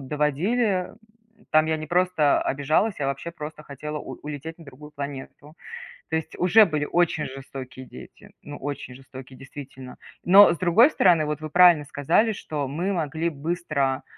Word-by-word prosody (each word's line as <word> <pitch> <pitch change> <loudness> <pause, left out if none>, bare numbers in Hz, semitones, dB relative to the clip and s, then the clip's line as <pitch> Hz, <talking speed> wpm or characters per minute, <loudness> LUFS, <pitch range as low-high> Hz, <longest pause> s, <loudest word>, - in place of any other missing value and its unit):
доводили. 180 - -1 0.6
Там 155 0 +4
я 160 0 0
не 155 0 -7
просто 175 -3 +2
обижалась, 155 +10 0
я 140 - -2
вообще 140 +4 -4
просто 155 -2 -9
хотела 150 +1 -7
у - - -8
улететь 150 +3 -7
на 165 - -13
другую 145 +1 -13
планету. 145 +1 -8 0.6
То 160 - -1
есть, 160 - -4
уже 210 +5 +6
были 155 -4 -2
очень 170 -2 0
жестокие 130 -1 -9
дети. 65 - -14
Ну, 145 - -9
очень 140 -2 -6
жестокие, 130 0 -12
действительно. 135 -1 -11 0.3
Но 195 +2 +7
с - - -7
другой 185 - +5
стороны, 175 - +3
вот, 150 +1 -4
вы 155 - -6
правильно 175 -2 +6
сказали, 160 +10 +1
что 150 -8 -4
мы 175 +8 -2
могли 160 -1 -2
быстро, 150 -3 -2
150 Hz, 160 wpm, -24 LUFS, 140-175 Hz, 0.6 s, Но